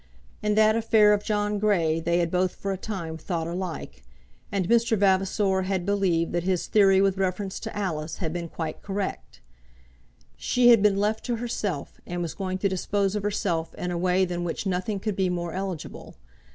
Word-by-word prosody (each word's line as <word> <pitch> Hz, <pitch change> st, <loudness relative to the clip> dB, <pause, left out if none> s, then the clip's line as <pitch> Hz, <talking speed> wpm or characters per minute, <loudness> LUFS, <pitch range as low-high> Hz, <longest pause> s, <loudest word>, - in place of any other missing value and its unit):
In 210 Hz, -1 st, +1 dB
that 215 Hz, 0 st, +5 dB
affair 220 Hz, -2 st, +5 dB
of 205 Hz, 0 st, 0 dB
John 210 Hz, -1 st, 0 dB
Grey 170 Hz, -7 st, +2 dB
they 170 Hz, +1 st, +1 dB
had 170 Hz, -1 st, 0 dB
both 180 Hz, 0 st, +1 dB
for 195 Hz, -, -3 dB
a -, -, -1 dB
time 175 Hz, -5 st, -5 dB
thought 165 Hz, 0 st, -3 dB
alike, 170 Hz, -, -5 dB, 0.5 s
and 195 Hz, -3 st, 0 dB
Mr. 230 Hz, 0 st, +3 dB
Vavasor 195 Hz, 0 st, +2 dB
had 190 Hz, -2 st, -1 dB
believed 190 Hz, -5 st, +1 dB
that 175 Hz, -, 0 dB
his 185 Hz, 0 st, 0 dB
theory 195 Hz, -2 st, +5 dB
with 195 Hz, 0 st, +2 dB
reference 190 Hz, +1 st, -2 dB
to -, -, -6 dB
Alice 160 Hz, -6 st, -3 dB
had 160 Hz, -4 st, -3 dB
been 170 Hz, -1 st, -4 dB
quite 160 Hz, -1 st, -5 dB
correct. 200 Hz, 0 st, -5 dB, 0.9 s
She 245 Hz, -1 st, +3 dB
had 230 Hz, -3 st, +7 dB
been 205 Hz, -1 st, +4 dB
left 210 Hz, +2 st, 0 dB
to 245 Hz, -, 0 dB
herself, 215 Hz, -9 st, -4 dB
and 175 Hz, 0 st, -3 dB
was 165 Hz, -, -4 dB
going 185 Hz, -1 st, -3 dB
to 200 Hz, -, +1 dB
dispose 195 Hz, +1 st, 0 dB
of 210 Hz, -, -1 dB
herself 195 Hz, -5 st, -2 dB
in 180 Hz, -, -3 dB
a -, -, -2 dB
way 185 Hz, +1 st, +2 dB
than 175 Hz, -1 st, -3 dB
which 175 Hz, +4 st, -3 dB
nothing 190 Hz, +2 st, -1 dB
could 210 Hz, 0 st, -2 dB
be 190 Hz, -1 st, +1 dB
more 175 Hz, -2 st, -3 dB
eligible. 190 Hz, -4 st, -6 dB
190 Hz, 190 wpm, -26 LUFS, 175-205 Hz, 0.9 s, had